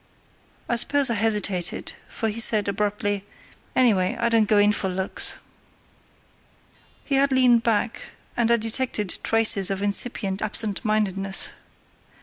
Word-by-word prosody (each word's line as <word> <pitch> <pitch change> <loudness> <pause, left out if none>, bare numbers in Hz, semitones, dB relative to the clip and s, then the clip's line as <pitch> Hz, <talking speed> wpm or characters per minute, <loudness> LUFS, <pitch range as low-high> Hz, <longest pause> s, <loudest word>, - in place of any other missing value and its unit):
I 235 - 0
suppose 280 +2 +3
I - - +1
hesitated, 205 -5 -1
for 225 - -4
he 215 +2 -5
said, 215 -2 +4
abruptly: 205 0 -2 0.5
"Anyway, 220 -4 +2
I 235 0 +1
don't 225 -2 +2
go 210 - +4
in 205 0 +4
for 195 -2 -1
looks." 190 +1 -1 1.7
He 280 - -4
had 275 0 +2
leaned 250 -3 +4
back, 230 0 -1 0.3
and 235 -1 +1
I 235 - +4
detected 225 -3 -2
traces 225 -3 +2
of 195 0 -3
incipient 200 -1 -1
absentmindedness. 205 -2 0
215 Hz, 130 wpm, -23 LUFS, 200-235 Hz, 1.7 s, said